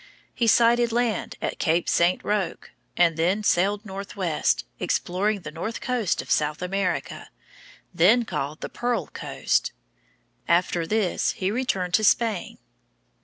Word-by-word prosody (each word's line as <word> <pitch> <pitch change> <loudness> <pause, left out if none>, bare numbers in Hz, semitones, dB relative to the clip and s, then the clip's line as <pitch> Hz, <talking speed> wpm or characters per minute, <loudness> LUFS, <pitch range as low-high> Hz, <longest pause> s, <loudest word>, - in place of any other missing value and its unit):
He 235 - 0
sighted 235 +1 +4
land 235 -3 -1
at - - -3
Cape 170 +1 +1
St. 175 +2 +2
Roque, 205 -5 -2 0.3
and 170 -2 +3
then 185 +6 +1
sailed 205 +3 +1
northwest, 195 -4 -2
exploring 200 +3 -1
the 150 - -7
north 195 +9 -5
coast 245 -7 -1
of - - -9
South 150 +3 +1
America, 185 -1 -2 0.6
then 210 +8 +4
called 150 -5 -4
the - - -3
Pearl 245 0 -1
Coast. - - -1 0.8
After 170 -1 +1
this 210 -3 0
he 190 +1 -2
returned 195 -7 -1
to 215 - +3
Spain. 215 -2 +1
195 Hz, 130 wpm, -25 LUFS, 175-220 Hz, 0.8 s, sighted